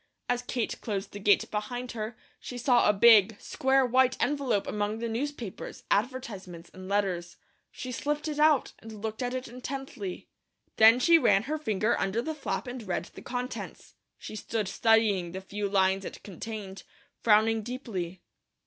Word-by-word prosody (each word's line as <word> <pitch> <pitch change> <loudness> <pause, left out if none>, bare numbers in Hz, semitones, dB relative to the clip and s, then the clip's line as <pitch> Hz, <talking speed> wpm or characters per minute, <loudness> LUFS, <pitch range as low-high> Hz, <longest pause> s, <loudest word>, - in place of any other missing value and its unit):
As 245 0 0
Kate 245 -2 -3
closed 200 -2 -3
the 205 - -7
gate 205 0 +3
behind 245 +4 -3
her, 220 +1 -5 0.2
she 250 - -7
saw 245 -2 +4
a - - +8
big, 210 0 +6
square 265 0 +2
white 255 +1 +3
envelope 270 -8 +1
among 210 +1 -2
the 235 +1 -3
newspapers, 235 -2 -5
advertisements, 200 -7 -2
and 185 0 -10
letters. 180 -4 -1 0.3
She 255 - -7
slipped 295 +4 -2
it 300 -1 -3
out 305 -2 +4
and 220 -2 -11
looked 220 +1 -4
at 250 0 -2
it 255 0 -4
intently. 250 -6 -6 0.5
Then 225 +2 +8
she 335 +5 +6
ran 200 - +4
her 305 +5 -3
finger 215 -5 +1
under 195 +4 0
the 315 - -3
flap 295 -2 -3
and 250 0 -6
read 175 - -1
the - - -10
contents. 250 +1 -6 0.2
She - - -8
stood 215 -1 -2
studying 210 -6 +2
the 190 - -4
few 200 +1 -4
lines 195 0 +2
it - - -8
contained, 195 -1 -7 0.4
frowning 220 0 +4
deeply. 205 -7 -5
225 Hz, 165 wpm, -28 LUFS, 200-250 Hz, 0.5 s, a